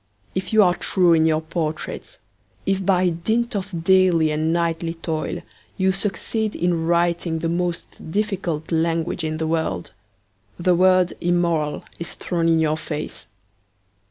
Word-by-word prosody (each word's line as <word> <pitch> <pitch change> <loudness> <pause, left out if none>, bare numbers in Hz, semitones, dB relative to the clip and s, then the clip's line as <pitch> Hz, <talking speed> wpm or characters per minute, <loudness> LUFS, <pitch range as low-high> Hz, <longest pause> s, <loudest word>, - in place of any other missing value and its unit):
If 185 -1 -3
you 220 -1 +6
are 180 -2 +4
true 175 -1 +2
in 160 0 +4
your 155 0 +2
portraits, 160 -1 -4 0.5
if, 195 0 0
by 185 -1 +3
dint 220 +8 -1
of 185 -4 -4
daily 180 -4 +4
and 155 +1 0
nightly 165 0 -1
toil, 160 -2 -3 0.3
you 190 0 +3
succeed 205 +3 -1
in 170 -2 0
writing 170 -1 +1
the 165 +1 -2
most 170 -2 -3
difficult 180 -6 -2
language 165 +1 0
in 155 0 -2
the 160 - -2
world, 160 - -2 0.6
the 180 +1 +2
word 185 0 +4
immoral 170 -4 +1 0.2
is 170 - -6
thrown 170 -2 -1
in 165 -1 +4
your 155 -1 +1
face.' 155 -1 -6
170 Hz, 145 wpm, -22 LUFS, 160-185 Hz, 0.6 s, you